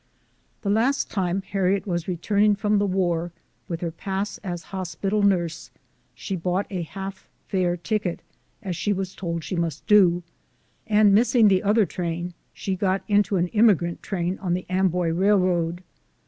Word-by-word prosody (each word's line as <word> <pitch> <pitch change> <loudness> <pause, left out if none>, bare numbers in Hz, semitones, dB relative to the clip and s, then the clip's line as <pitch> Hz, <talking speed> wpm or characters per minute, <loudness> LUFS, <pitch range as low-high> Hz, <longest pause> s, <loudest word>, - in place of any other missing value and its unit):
The 200 - 0
last 245 +7 +1
time 190 -1 -1
Harriet 195 0 0
was 175 -4 -2
returning 205 +4 +2
from 210 0 +1
the 205 - +1
war, 175 -3 0 0.4
with 170 -1 -4
her 170 -2 -2
pass 195 +4 -4
as 175 -3 -5
hospital 190 +3 -2
nurse, 175 -5 +1 0.5
she 195 - -4
bought 180 +3 -1
a 185 -2 -2
half 190 +3 -7 0.2
fare 180 -2 0
ticket, 200 -1 -2 0.4
as 185 -3 -3
she 190 +5 0
was 190 -1 -4
told 170 -3 -4
she 185 - -4
must 160 -4 -2
do; 180 -4 +5 0.6
and 210 -2 +5
missing 225 0 +5
the 190 -1 +3
other 210 +1 +3
train, 175 0 -4 0.2
she 190 - -3
got 190 0 0
into 205 -1 +2
an 175 0 0
emigrant 200 -6 +3
train 180 -1 -2
on 180 -3 -1
the 180 - -4
Amboy 180 -2 +1
Railroad. 180 -1 +1
185 Hz, 160 wpm, -24 LUFS, 175-200 Hz, 0.6 s, do